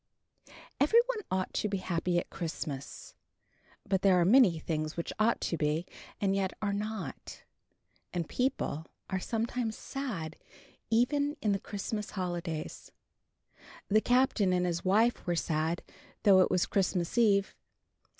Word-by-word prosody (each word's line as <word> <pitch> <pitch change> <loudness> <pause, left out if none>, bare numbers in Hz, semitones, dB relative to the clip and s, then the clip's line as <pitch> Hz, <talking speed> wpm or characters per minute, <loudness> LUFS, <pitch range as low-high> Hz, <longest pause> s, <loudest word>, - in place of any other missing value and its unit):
Every 300 +12 +6
one - - -2
ought 185 0 -1
to 210 - 0
be 200 - -1
happy 175 -1 -1
at 175 - -2
Christmas. 150 -4 -5 0.7
But 190 -1 +1
there 190 -2 +5
are 170 - +4
many 205 -4 +6
things 155 0 -3
which 170 - -3
ought 220 +2 +3
to 170 - -1
be, 155 +3 0 0.3
and 195 -1 +1
yet 190 -1 0
are 205 -1 -1
not; 215 0 -5 0.7
and 170 -3 -2
people 205 - -1 0.2
are 190 - 0
sometimes 225 +2 -2
sad 200 - -5 0.5
even 285 +6 +2
in 210 - +1
the 195 - +1
Christmas 210 +2 -4
holidays. 175 -4 -4 1.0
The 215 +2 +4
Captain 245 -7 +3
and 180 0 +2
his 170 -1 -1
wife 215 +4 +2
were 175 - +1
sad, 160 +1 -1 0.4
though 195 -3 +7
it - - +3
was 180 -1 +2
Christmas 185 -4 0
Eve. 200 -4 +3
190 Hz, 140 wpm, -31 LUFS, 170-220 Hz, 1.0 s, though